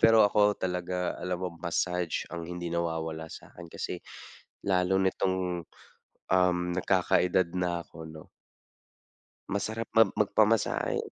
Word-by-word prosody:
pero 115 Hz, -1 st, +7 dB
ako 105 Hz, 0 st, +4 dB
talaga, 90 Hz, 0 st, -2 dB
alam 90 Hz, -1 st, -2 dB
mo, 90 Hz, -, 0 dB
massage 90 Hz, 0 st, -1 dB
ang 85 Hz, -1 st, -5 dB
hindi 85 Hz, -1 st, -5 dB
nawawala 80 Hz, -1 st, -2 dB
sa'kin. 85 Hz, +1 st, -11 dB
Kasi -, -, -4 dB, 0.7 s
lalo 95 Hz, 0 st, +3 dB
nitong, 95 Hz, -2 st, 0 dB, 0.7 s
um, 90 Hz, -1 st, +4 dB, 0.2 s
nagkakaedad 90 Hz, -1 st, +2 dB
na 85 Hz, -1 st, 0 dB
ako, -, -, -19 dB
'no 80 Hz, 0 st, -10 dB, 1.3 s
masarap 110 Hz, +3 st, -2 dB
mam 115 Hz, -3 st, +6 dB
magpamasahe. 105 Hz, +1 st, +2 dB
90 Hz, 115 wpm, -29 LUFS, 85-95 Hz, 1.3 s, pero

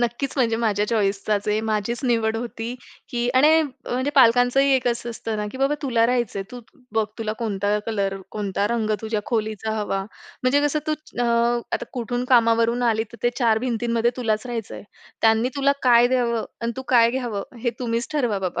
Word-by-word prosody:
नक्कीच 240 Hz, +3 st, -1 dB
म्हणजे 230 Hz, -3 st, +2 dB
माझ्या 210 Hz, -2 st, +1 dB
चॉईस 200 Hz, -3 st, 0 dB
चाच 210 Hz, -1 st, 0 dB
आहे, 210 Hz, +1 st, +1 dB
माझीच 220 Hz, +1 st, -2 dB
निवड 225 Hz, -2 st, +1 dB
होती 235 Hz, 0 st, -5 dB, 0.3 s
की 240 Hz, -2 st, -1 dB
आणि 310 Hz, +5 st, +6 dB
म्हणजे 260 Hz, -1 st, -3 dB
पालकांचंही 250 Hz, +2 st, +5 dB
एक 255 Hz, -1 st, 0 dB
असं 235 Hz, 0 st, -2 dB
असतं 225 Hz, -1 st, -4 dB
ना, 210 Hz, 0 st, -2 dB
की 260 Hz, -, -8 dB
बाबा 275 Hz, +2 st, +2 dB
तुला 235 Hz, -4 st, +2 dB
राहायचंय, 240 Hz, -5 st, -1 dB
तू 245 Hz, -1 st, -8 dB, 0.3 s
बघ 220 Hz, -1 st, +3 dB
तुला 215 Hz, -1 st, -2 dB
कोणता 205 Hz, -2 st, 0 dB
कलर, 200 Hz, -3 st, -1 dB
कोणता 205 Hz, -1 st, -1 dB
रंग 225 Hz, -2 st, -1 dB
तुझ्या 220 Hz, -1 st, -2 dB
खोलीचा 220 Hz, -1 st, -2 dB
हवा. 195 Hz, -2 st, -1 dB, 0.4 s
म्हणजे 265 Hz, +3 st, +3 dB
कसं 295 Hz, +1 st, +1 dB
तू 310 Hz, -, +1 dB, 0.3 s
अ, 245 Hz, -, +2 dB, 0.5 s
आता -, -, -1 dB
कुठून 245 Hz, 0 st, -2 dB
कामावरून 230 Hz, 0 st, +3 dB
आली 220 Hz, 0 st, 0 dB
तर 235 Hz, -, -13 dB
ते 240 Hz, -, +3 dB
4 225 Hz, -3 st, +3 dB
भिंतींमध्ये 235 Hz, -1 st, 0 dB
तुलाच 220 Hz, -1 st, -1 dB
राहायचं 230 Hz, -3 st, -5 dB
आहे. -, -, -9 dB, 0.4 s
त्यांनी 225 Hz, +2 st, +3 dB
तुला 280 Hz, 0 st, +3 dB
काय 240 Hz, -1 st, +6 dB
द्यावं 235 Hz, -3 st, +1 dB, 0.2 s
अन् 230 Hz, 0 st, -2 dB
तू 265 Hz, -, -4 dB
काय 235 Hz, -2 st, +5 dB
घ्यावं, 240 Hz, -6 st, -3 dB, 0.2 s
हे 240 Hz, -, +1 dB
तुम्हीच 235 Hz, -1 st, -2 dB
ठरवा 240 Hz, -9 st, 0 dB
बाबा 180 Hz, -2 st, -3 dB
235 Hz, 185 wpm, -23 LUFS, 220-245 Hz, 0.5 s, आणि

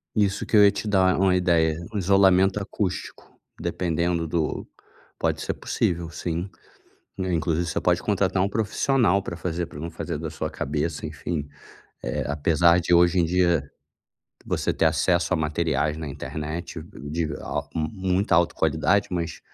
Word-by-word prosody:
Isso 100 Hz, -2 st, +1 dB
que 110 Hz, -, +2 dB
eu 105 Hz, -, +8 dB
ia 100 Hz, -, +7 dB
te 110 Hz, -, -5 dB
dar 95 Hz, -3 st, +3 dB
uma 95 Hz, -1 st, +4 dB
ideia, 85 Hz, -3 st, +2 dB, 0.2 s
um -, -, -2 dB
isolamento 95 Hz, 0 st, +4 dB
acústico, 100 Hz, -1 st, -4 dB, 0.2 s
dependendo 85 Hz, -1 st, -1 dB
do 80 Hz, -1 st, -2 dB, 0.5 s
pode -, -, 0 dB
ser -, -, -2 dB
possível 85 Hz, -1 st, -1 dB
sim, 85 Hz, +2 st, -4 dB, 0.7 s
né, 95 Hz, -1 st, -2 dB
inclusive 80 Hz, +1 st, 0 dB
você 85 Hz, -, -2 dB
pode 90 Hz, 0 st, +2 dB
contratar 95 Hz, -2 st, +1 dB
um 100 Hz, -, +2 dB
profissional 110 Hz, -1 st, +1 dB
pra 85 Hz, -, -6 dB
fazer 85 Hz, 0 st, -2 dB
para 75 Hz, -, -11 dB
não 85 Hz, +2 st, -5 dB
fazer 80 Hz, -, -4 dB
da 80 Hz, 0 st, -4 dB
sua 80 Hz, 0 st, -4 dB
cabeça 80 Hz, +1 st, -3 dB
enfim, 75 Hz, 0 st, -4 dB, 0.5 s
eh, -, -, -2 dB
apesar 85 Hz, +4 st, +3 dB
de 90 Hz, +1 st, -1 dB
hoje 85 Hz, +1 st, +5 dB
em -, -, +3 dB
dia, 85 Hz, -4 st, +1 dB, 0.7 s
você -, -, -1 dB
ter -, -, +2 dB
acesso 80 Hz, -2 st, +2 dB
a -, -, +3 dB
materiais 75 Hz, -1 st, 0 dB
na 80 Hz, -2 st, -5 dB
internet, 80 Hz, +4 st, -5 dB
de 85 Hz, -3 st, -5 dB
eh, -, -, -4 dB
a -, -, -3 dB
muita 95 Hz, +2 st, 0 dB
alta 85 Hz, 0 st, +3 dB
qualidade, 80 Hz, +6 st, +2 dB
mas 85 Hz, -2 st, -3 dB
85 Hz, 165 wpm, -25 LUFS, 80-95 Hz, 0.7 s, eu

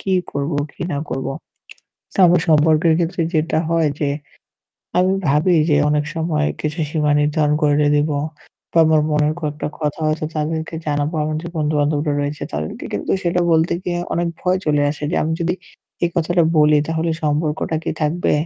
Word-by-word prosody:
কি 195 Hz, -, -2 dB, 0.2 s
করব, 140 Hz, +3 st, -2 dB, 0.2 s
কি -, -, -7 dB
না 140 Hz, -, -1 dB
করব। 135 Hz, -, -3 dB, 0.9 s
তো -, -, -10 dB
আমার 175 Hz, 0 st, +4 dB
সম্পর্কের 155 Hz, +1 st, +4 dB
ক্ষেত্রে 170 Hz, 0 st, 0 dB
যেটা 155 Hz, 0 st, +1 dB
হয় 165 Hz, -2 st, +2 dB
যে 145 Hz, -, +1 dB, 0.9 s
আমি 185 Hz, +1 st, +3 dB, 0.2 s
ভাবি 150 Hz, +6 st, +3 dB, 0.2 s
যে 145 Hz, -, +4 dB
অনেক 150 Hz, 0 st, +1 dB
সময় 160 Hz, -2 st, 0 dB
কিছু 155 Hz, +2 st, -3 dB
সীমা 150 Hz, -2 st, +1 dB
নির্ধারণ 150 Hz, 0 st, +2 dB
করে 145 Hz, -1 st, +3 dB, 0.2 s
দেব 145 Hz, +1 st, +1 dB, 0.6 s
বা 170 Hz, -, +4 dB
আমার 155 Hz, -1 st, +4 dB
মনের 150 Hz, 0 st, +2 dB
কয়েকটা 150 Hz, -1 st, -3 dB
কথা 150 Hz, 0 st, -2 dB
হয়তো 155 Hz, 0 st, 0 dB
তাদেরকে 160 Hz, +1 st, -2 dB
জানাব, 145 Hz, -1 st, 0 dB
আমার 155 Hz, 0 st, -1 dB
যে 170 Hz, -, -6 dB
বন্ধু-বান্ধবরা 150 Hz, 0 st, +1 dB
রয়েছে 145 Hz, +1 st, -3 dB
তাদেরকে। 75 Hz, +1 st, -4 dB
কিন্তু -, -, -2 dB
সেটা 175 Hz, 0 st, +1 dB
বলতে 160 Hz, +1 st, +3 dB
গিয়ে 175 Hz, -1 st, -2 dB, 0.2 s
অনেক 170 Hz, 0 st, 0 dB
ভয় 185 Hz, +1 st, +1 dB
চলে 150 Hz, -1 st, +2 dB
আসে 150 Hz, 0 st, -6 dB
যে -, -, -1 dB
আমি 160 Hz, -, -1 dB
যদি 170 Hz, +1 st, 0 dB, 0.5 s
এই 170 Hz, -, +1 dB
কথাটা 170 Hz, +1 st, +2 dB, 0.2 s
বলি 150 Hz, 0 st, +5 dB
তাহলে 165 Hz, +1 st, 0 dB
সম্পর্কটা 150 Hz, +1 st, 0 dB
কি -, -, -1 dB
থাকবে? 160 Hz, +4 st, +1 dB
155 Hz, 170 wpm, -20 LUFS, 150-165 Hz, 0.9 s, বলি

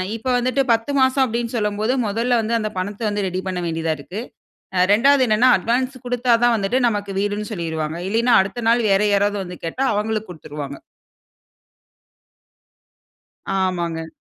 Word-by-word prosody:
இப்போ 230 Hz, +3 st, -4 dB
வந்துட்டு 255 Hz, +3 st, +1 dB
10 225 Hz, +5 st, -1 dB
மாசம் 260 Hz, +1 st, +3 dB
அப்டீன்னு 235 Hz, -1 st, -2 dB
சொல்லும்போது, 215 Hz, +2 st, 0 dB
முதல்ல 235 Hz, +4 st, +1 dB
வந்து 225 Hz, +1 st, -2 dB
அந்த 215 Hz, -, -2 dB
பணத்த 200 Hz, +4 st, -4 dB
வந்து 205 Hz, -1 st, -2 dB
ரெடி 185 Hz, 0 st, -3 dB
பண்ண 185 Hz, -1 st, -2 dB
வேண்டியதா 165 Hz, -1 st, -1 dB
இருக்கு. 180 Hz, +8 st, -7 dB, 0.6 s
அ 180 Hz, -, +2 dB
2வது 270 Hz, +4 st, +4 dB
என்னன்னா, 220 Hz, +4 st, +4 dB
அட்வான்ஸ் 250 Hz, +7 st, -1 dB
குடுத்தா 245 Hz, 0 st, 0 dB
தான் 240 Hz, -1 st, +5 dB
வந்துட்டு, 205 Hz, +3 st, 0 dB
"நமக்கு 205 Hz, -3 st, -2 dB
வீடுன்னு" 205 Hz, +1 st, -2 dB
சொல்லிருவாங்க. 160 Hz, -4 st, -3 dB
இல்லேன்னா, 230 Hz, +4 st, +2 dB
அடுத்த 205 Hz, +5 st, -4 dB
நாள் 235 Hz, 0 st, +3 dB
வேறு 195 Hz, +2 st, +3 dB
யாராவது 205 Hz, +1 st, +2 dB
வந்து 180 Hz, -1 st, -8 dB
கேட்டா, 250 Hz, +11 st, -2 dB
அவங்களுக்கு 215 Hz, 0 st, -2 dB
குடுத்துருவாங்க. 145 Hz, -4 st, -7 dB, 2.8 s
ஆமாங்க. 170 Hz, -3 st, -2 dB
210 Hz, 150 wpm, -21 LUFS, 185-240 Hz, 2.8 s, தான்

